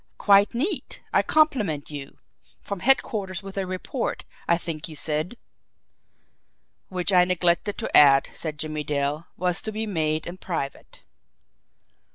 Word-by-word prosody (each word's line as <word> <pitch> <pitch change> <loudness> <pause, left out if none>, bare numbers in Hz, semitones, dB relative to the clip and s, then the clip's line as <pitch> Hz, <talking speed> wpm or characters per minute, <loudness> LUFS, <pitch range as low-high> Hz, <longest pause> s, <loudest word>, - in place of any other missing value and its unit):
"Quite 200 +2 +4
neat! 305 - -2
I - - +5
compliment 215 - +1
you! 140 -2 -8 0.4
From 200 -2 -6
headquarters 205 -6 +1
with 195 0 -9
a 195 -1 -2
report, 185 +7 -3 0.2
I 170 - +4
think 165 -2 -5
you 155 - -9
said?" 155 +9 -2 1.5
"Which 185 +1 -1
I 180 -1 +7
neglected 180 +2 +1
to - - -2
add," 135 -2 +7
said 155 -2 -5
Jimmie 155 0 -3
Dale, 145 +2 -2
"was 180 0 +1
to 220 - -4
be 220 +1 -3
made 155 -6 -1
in 175 +2 -7
private." 140 -6 -5
180 Hz, 140 wpm, -25 LUFS, 155-200 Hz, 1.5 s, I